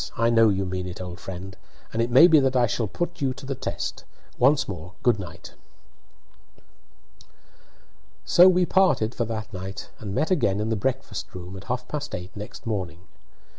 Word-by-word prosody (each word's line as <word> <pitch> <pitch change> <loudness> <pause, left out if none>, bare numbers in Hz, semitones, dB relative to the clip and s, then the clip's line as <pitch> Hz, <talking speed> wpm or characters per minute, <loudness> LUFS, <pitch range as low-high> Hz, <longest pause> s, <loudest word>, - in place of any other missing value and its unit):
I 115 +1 +3
know 115 -1 +6
you 95 -1 0
mean 90 0 -3
it, 90 - -7
old 90 -1 -7
friend, 95 +1 -7 0.4
and 115 - 0
it 115 - 0
may 130 +7 +8
be 160 -3 +7
that 135 -1 +1
I 125 -1 +5
shall 115 -1 -1
put 175 - -4
you 130 -2 0
to - - -10
the 135 - -2
test. - - -4 0.4
Once 135 +3 +4
more, 90 -1 -7
good 120 -4 +3
night." 85 -3 -9 2.7
So 180 +2 +7
we 180 0 +3
parted 150 - +2
for 120 - -1
that 110 0 -5
night, 95 +1 -7
and 100 -2 -5
met 160 - 0
again 105 - +2
in 105 +1 -1
the 110 - +1
breakfast 120 -3 -3
room 90 +1 -8
at 95 0 -10
half 125 +1 -3
past 150 -1 -4
eight 90 +1 -8
next 105 +3 -9
morning. 95 -6 -3
110 Hz, 185 wpm, -25 LUFS, 95-130 Hz, 2.7 s, may